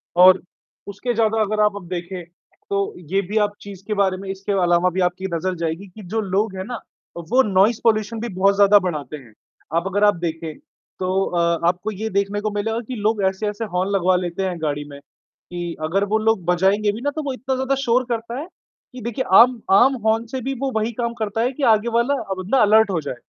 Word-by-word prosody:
और 185 Hz, +1 st, +7 dB, 0.5 s
उसके 205 Hz, +5 st, -3 dB
ज़्यादा 225 Hz, -1 st, +1 dB
अगर 215 Hz, 0 st, 0 dB
आप 210 Hz, -1 st, +2 dB
अब 185 Hz, -4 st, -8 dB
देखे, 180 Hz, 0 st, -5 dB
तो 200 Hz, +3 st, -5 dB, 0.2 s
ये 195 Hz, -, +2 dB
भी 215 Hz, -, -1 dB
आप 205 Hz, -, -6 dB
चीज़ 195 Hz, -2 st, -10 dB
के 215 Hz, -, -1 dB
बारे 195 Hz, -2 st, +1 dB
में 195 Hz, 0 st, -8 dB
इसके 195 Hz, +1 st, -4 dB
अलावा 175 Hz, +1 st, +3 dB
भी 185 Hz, +1 st, -2 dB
आपकी 180 Hz, +2 st, -1 dB
नज़र 185 Hz, +2 st, -2 dB
जाएगी 165 Hz, +4 st, -4 dB
कि 205 Hz, +4 st, -13 dB
जो 225 Hz, -, +1 dB
लोग 200 Hz, 0 st, -1 dB
है 185 Hz, -, -3 dB
ना 245 Hz, -2 st, -5 dB, 0.4 s
वो 215 Hz, +10 st, +2 dB
नोइस 205 Hz, +3 st, +3 dB
पॉल्यूशन 220 Hz, 0 st, +1 dB
भी 235 Hz, -, -4 dB
बहुत 195 Hz, +2 st, +3 dB
ज़्यादा 205 Hz, 0 st, +6 dB
बढ़ाते 150 Hz, -6 st, -4 dB
हैं। 120 Hz, -6 st, -16 dB, 0.4 s
अब 170 Hz, +3 st, +1 dB
अगर 200 Hz, +2 st, 0 dB
आप 205 Hz, -2 st, +5 dB
देखें 165 Hz, -2 st, -4 dB, 0.4 s
तो 185 Hz, +1 st, 0 dB
अ, 170 Hz, -1 st, +1 dB
आपको 180 Hz, +4 st, 0 dB
ये 215 Hz, +2 st, -4 dB
देखने 200 Hz, +1 st, -1 dB
को 215 Hz, -, -1 dB
मिलेगा 220 Hz, +3 st, -2 dB
कि 255 Hz, -, -5 dB
लोग 215 Hz, -1 st, 0 dB
ऐसे-ऐसे 205 Hz, +3 st, -1 dB
हॉर्न 185 Hz, +2 st, 0 dB
लगवा 185 Hz, -2 st, +2 dB
लेते 180 Hz, +1 st, -2 dB
हैं, 185 Hz, -2 st, -2 dB
गाड़ी 145 Hz, -1 st, -2 dB
में 140 Hz, 0 st, -10 dB, 0.5 s
कि 175 Hz, -1 st, -4 dB
अगर 190 Hz, +6 st, +1 dB
वो -, -, +5 dB
लोग 220 Hz, -4 st, +1 dB
बजाएँगे 190 Hz, +4 st, +2 dB
भी 215 Hz, +3 st, -7 dB
ना 285 Hz, -, 0 dB
तो 310 Hz, -, -3 dB
वो 275 Hz, -2 st, -2 dB
इतना 260 Hz, +2 st, -3 dB
ज़्यादा 265 Hz, +1 st, 0 dB
शोर 245 Hz, +1 st, +3 dB
करता 235 Hz, +1 st, -3 dB
है 315 Hz, -, -6 dB, 0.5 s
कि 255 Hz, -, -9 dB
देखिए 240 Hz, +3 st, -3 dB
आम 245 Hz, +1 st, +6 dB
आम 250 Hz, +8 st, +6 dB
हॉर्न 225 Hz, +1 st, +2 dB
से 260 Hz, +3 st, -5 dB
भी 270 Hz, +3 st, -2 dB
वो 270 Hz, -, -1 dB
वही 220 Hz, +2 st, -1 dB
काम 235 Hz, 0 st, -1 dB
करता 220 Hz, +1 st, -1 dB
है 245 Hz, +2 st, +1 dB
कि 280 Hz, -, -6 dB
आगे 215 Hz, +2 st, 0 dB
वाला 235 Hz, +5 st, +2 dB, 0.2 s
बंदा 190 Hz, +8 st, 0 dB
अलर्ट 215 Hz, +1 st, +5 dB
हो 170 Hz, -4 st, -1 dB
जाए। 140 Hz, -3 st, -5 dB
200 Hz, 225 wpm, -21 LUFS, 180-225 Hz, 0.5 s, और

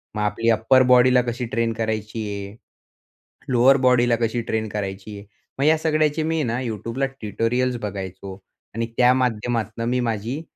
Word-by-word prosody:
मग 105 Hz, -, -2 dB
आपली 105 Hz, +3 st, 0 dB
upper 115 Hz, +4 st, +4 dB
body 125 Hz, +1 st, +5 dB
ला 125 Hz, -, +5 dB
कशी 120 Hz, 0 st, -4 dB
ट्रेन 115 Hz, 0 st, -1 dB
करायची 110 Hz, -1 st, -3 dB
आहे. 100 Hz, +1 st, -7 dB, 1.0 s
लोअर 130 Hz, +3 st, +5 dB
बॉडीला 120 Hz, -1 st, +4 dB
कशी 115 Hz, +1 st, 0 dB
ट्रेन 110 Hz, -1 st, -2 dB
करायची. 100 Hz, 0 st, -6 dB, 0.4 s
मग 140 Hz, -, +2 dB
या 160 Hz, +1 st, +5 dB
सगळ्याचे 155 Hz, -1 st, +1 dB
मी 160 Hz, 0 st, 0 dB
ना 120 Hz, +1 st, -2 dB
YouTubeला 115 Hz, +3 st, -3 dB, 0.2 s
ट्यूटोरियल्स 120 Hz, +4 st, -1 dB
बघायचो 95 Hz, -1 st, -6 dB, 0.4 s
आणि 115 Hz, 0 st, -1 dB
त्या 125 Hz, 0 st, +5 dB
माध्यमातनं 115 Hz, -2 st, -1 dB
मी 125 Hz, 0 st, 0 dB
माझी 115 Hz, +5 st, -3 dB
115 Hz, 155 wpm, -22 LUFS, 110-125 Hz, 1.0 s, body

